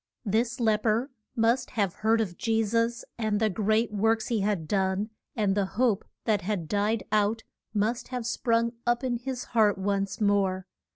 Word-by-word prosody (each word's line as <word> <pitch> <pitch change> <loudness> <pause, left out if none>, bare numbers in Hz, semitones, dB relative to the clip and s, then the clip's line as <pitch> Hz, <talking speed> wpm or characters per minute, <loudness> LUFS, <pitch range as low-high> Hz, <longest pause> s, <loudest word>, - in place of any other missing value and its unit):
This 230 +4 0
lep 220 -3 +2
er 230 +6 +1 0.2
must 230 +3 +2
have 200 -4 +1
heard 225 +1 +2
of 185 -5 -3
Je 225 +2 +1
sus 230 +2 0
and 215 -2 0
the 220 -1 +2
great 215 +3 +1
works 220 +2 +1
he 230 -3 +1
had 195 -5 -1
done, 195 +2 0 0.2
and 205 -4 +2
the 200 -1 +1
hope 230 -5 +2 0.2
that 215 -3 +2
had 180 -3 -2
died 210 +3 0
out 215 +1 +2 0.3
must 220 +3 -1
have 250 -2 -4
sprung 230 0 +1 0.2
up 240 +2 +2
in 250 -2 0
his 250 +1 -4
heart 215 -3 +4
once 195 +1 -1
more. 195 -3 +1
215 Hz, 175 wpm, -27 LUFS, 205-230 Hz, 0.3 s, heart